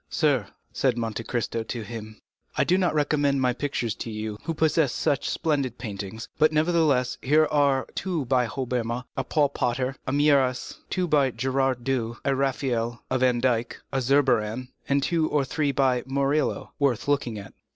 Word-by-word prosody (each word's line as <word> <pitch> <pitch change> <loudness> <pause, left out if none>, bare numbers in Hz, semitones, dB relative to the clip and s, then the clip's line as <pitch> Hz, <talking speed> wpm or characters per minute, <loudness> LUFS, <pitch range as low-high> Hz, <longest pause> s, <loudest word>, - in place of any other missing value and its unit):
"Sir," - - +1 0.3
said 130 -3 +1
Monte 115 -1 -3
Cristo 115 -1 -2
to 115 +1 -5
him, 110 -1 -8 0.4
"I - - +4
do 180 - +3
not 180 -4 +1
recommend 145 -2 +2
my 125 -1 +2
pictures 120 -3 -2
to - - -5
you, 110 -1 -5
who 165 - -2
possess 160 -3 +2
such 140 - 0
splendid 140 -7 -1
paintings; 105 -1 -6
but, 155 0 +5
nevertheless, 155 -5 +2
here 155 +4 +4
are 140 -3 +3
two 175 -7 -2
by 125 -1 +2
Hobbema, 125 -1 -2
a 135 - -1
Paul 145 +2 +2
Potter, 130 0 -1
a - - 0
Mieris, 140 -3 +2
two 185 -1 0
by 145 -4 +3
Gerard 130 +1 0
Douw, 120 -3 -1
a 140 - +3
Raphael, 125 -4 -1
a 130 - +2
Van 125 -1 +3
Dyck, 120 -2 0
a 135 - +1
Zurbaran, 125 -3 +2 0.2
and 140 0 +2
two 160 -1 +1
or 145 -2 +1
three 145 +2 0
by 130 -2 +2
Murillo, 140 +2 0
worth 140 -5 +1
looking 140 -6 0
at." 100 -1 -9
130 Hz, 170 wpm, -26 LUFS, 120-145 Hz, 0.4 s, but